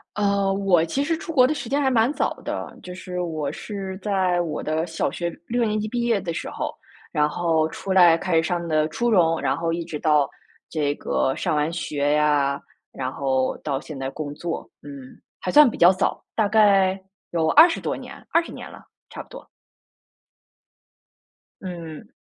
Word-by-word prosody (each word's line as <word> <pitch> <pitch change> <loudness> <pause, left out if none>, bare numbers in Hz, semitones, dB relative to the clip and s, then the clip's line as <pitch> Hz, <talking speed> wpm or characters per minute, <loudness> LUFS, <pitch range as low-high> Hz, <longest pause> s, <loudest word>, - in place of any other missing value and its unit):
呃， 200 -1 +1
我 195 -4 +3
其 265 +12 -1
实 325 +2 0
出 330 0 -7
国 255 -4 +6
的 310 - 0
时 245 - -6
间 285 +1 +1
还 265 -2 +2
蛮 235 +3 +3
早 - - 0
的， - - -5
就 180 - -8
是 180 -1 -6
我 155 -5 -2
是 195 -3 -6
在 190 -4 +1
我 155 -3 -4
的 160 +2 -1
小 165 -1 -2
学 170 0 -3 0.2
6 240 0 0
年 215 -1 0
级 215 - -3
毕 240 +1 -2
业 230 -4 +1
的 170 -2 -4
时 - - -5
候， - - -3 0.4
然 150 0 +2
后 160 -1 +1
出 195 - -7
来 175 -3 +7
开 180 -1 -2
始 160 - +4
上 170 +1 -2
的 155 -1 +2
初 235 +9 -1
中， 165 -6 +3
然 - - 0
后 165 0 -1
一 170 0 -2
直 160 -3 -6
到 150 -3 +3 0.4
这 145 -3 -1
个 135 - 0
上 155 - -1
完 150 +2 0
学 145 -3 -1
呀， 145 -2 +2 0.3
然 130 -1 -3
后 130 -1 0
到 140 -3 -3
现 150 -3 -9
在 135 0 -3
工 145 0 -6
作， 170 +2 -5
嗯， 140 -3 -11 0.2
还 180 - -2
算 295 -3 +8
比 - - -8
较 175 - +8
早， 190 +1 -1
大 220 - +2
概 195 -3 +4 0.3
有 165 -2 0
20 330 +3 +6
多 - - -2
年 - - -9 0.2
20 335 0 +2
年 - - -9
了， - - -13 0.3
差 - - -8
不 - - -24
多。 - - -11 2.2
嗯。 170 -4 -8
175 Hz, 200 characters per minute, -23 LUFS, 155-205 Hz, 2.2 s, 算